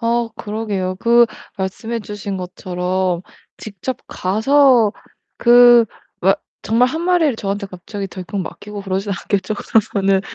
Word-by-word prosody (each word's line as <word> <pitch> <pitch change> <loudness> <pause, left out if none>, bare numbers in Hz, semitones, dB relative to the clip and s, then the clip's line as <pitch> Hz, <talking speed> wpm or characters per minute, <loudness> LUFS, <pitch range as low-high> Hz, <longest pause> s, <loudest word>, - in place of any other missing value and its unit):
아 235 0 +1
그러게요. 205 -4 -3
그 235 0 +5 0.3
말씀해 220 +5 -3
주신 205 -2 -5
것처럼 180 0 -2 0.3
직접 215 +4 -5
가서 230 +3 +3 0.5
그 240 -1 +7 0.4
와 195 +2 +4 0.3
정말 230 +4 +3
1 320 +5 -3
마리를 340 -8 +2
저한테 200 0 -3
갑자기 195 +2 -7
덜컥 190 +1 -5
맡기고 205 +3 -7
그러진 195 +1 -2
않겠죠? 195 +2 -2
그러면은 195 -3 +1
205 Hz, 265 characters per minute, -19 LUFS, 190-235 Hz, 0.5 s, 그